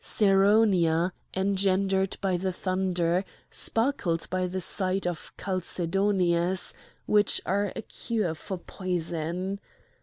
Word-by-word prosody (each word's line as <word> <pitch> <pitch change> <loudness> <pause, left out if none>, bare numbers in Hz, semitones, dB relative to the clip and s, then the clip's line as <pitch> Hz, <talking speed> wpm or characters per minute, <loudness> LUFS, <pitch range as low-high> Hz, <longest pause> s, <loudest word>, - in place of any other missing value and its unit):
Ceraunia, 195 -4 +3 0.2
engendered 195 0 +1
by 190 -2 +1
the 185 +2 -1
thunder, 185 -1 0 0.3
sparkled 225 -9 0
by 185 0 0
the 185 +1 -3
side 190 +1 +1
of 175 -2 -4
chalcedonies, 185 -1 0 0.3
which 210 -1 +3
are 200 +1 0
a - - -5
cure 210 -8 -2
for 185 +4 -6
poison. 180 +1 -3
185 Hz, 100 wpm, -27 LUFS, 175-195 Hz, 0.3 s, Ceraunia